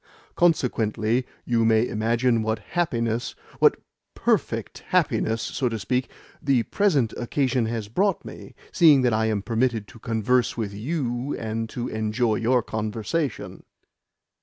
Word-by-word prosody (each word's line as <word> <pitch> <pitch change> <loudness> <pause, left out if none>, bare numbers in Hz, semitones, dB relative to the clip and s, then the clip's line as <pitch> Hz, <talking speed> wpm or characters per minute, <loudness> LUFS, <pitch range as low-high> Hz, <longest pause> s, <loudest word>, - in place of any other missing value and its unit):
"Consequently 120 -7 +1 0.2
you 115 -2 +2
may 110 +1 +3
imagine 115 +2 +1
what 110 0 0
happiness 115 -4 -2 0.2
what - - +5 0.4
PERFECT - - -1
happiness, 110 +1 +1
so 125 - -1
to 115 - -3
speak 125 +5 -1 0.3
the 135 -6 +2
present 145 - +1
occasion 125 -1 0
has 115 -2 -3
brought 190 - 0
me, - - -10 0.2
seeing 150 -7 +6
that 120 -2 +3
I 110 0 +2
am 105 -3 -1
permitted 115 -1 0
to 115 - -14
converse 115 +3 +1
with 105 -3 -3
you 125 +2 -2
and 115 0 -3
to 120 +1 -4
enjoy 110 0 0
your 120 +1 +2
conversation." 110 +8 -3
115 Hz, 135 wpm, -24 LUFS, 110-130 Hz, 0.4 s, seeing